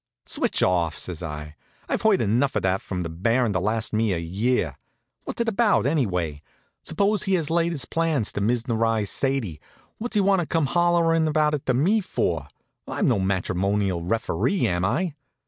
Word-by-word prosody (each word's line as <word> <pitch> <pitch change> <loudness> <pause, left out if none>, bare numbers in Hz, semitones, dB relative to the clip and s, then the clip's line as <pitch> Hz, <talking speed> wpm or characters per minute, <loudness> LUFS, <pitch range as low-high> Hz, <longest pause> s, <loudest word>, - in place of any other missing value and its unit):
"Switch - - 0
off!" 85 -4 +1
says 90 -3 -6
I. 75 -2 -6 0.3
"I've - - -1
heard 220 -3 +3
enough 120 +6 +1
of - - 0
that 95 0 +1
from 90 -2 -4
the 85 - -3
Baron 115 +7 +1
to 90 - +1
last 110 +4 -1
me 110 -2 +2
a - - -1
year. 90 - -1 0.5
What's - - -3
it 235 - 0
all - - +2
about, 215 - +3
anyway? 90 - 0 0.4
Suppose 200 +6 0
he 195 -1 +2
has 160 -4 -1
laid 170 0 +2
his 140 -8 -1
plans 160 -8 0
to - - -3
Miznerize 115 -2 +1
Sadie; 130 - -1 0.4
what's 240 +1 -4
he 205 - +4
want 195 -1 +3
to 170 - -2
come 165 -3 +1
hollerin' 170 -1 +3
about 150 0 +2
it 145 - -3
to 130 - +2
me 185 - +3
for? 85 - -2 0.4
I'm - - 0
no - - +2
matrimonial 95 0 0
referee, 115 - 0
am 90 0 0
I?" 150 - 0
115 Hz, 185 wpm, -24 LUFS, -, 0.5 s, he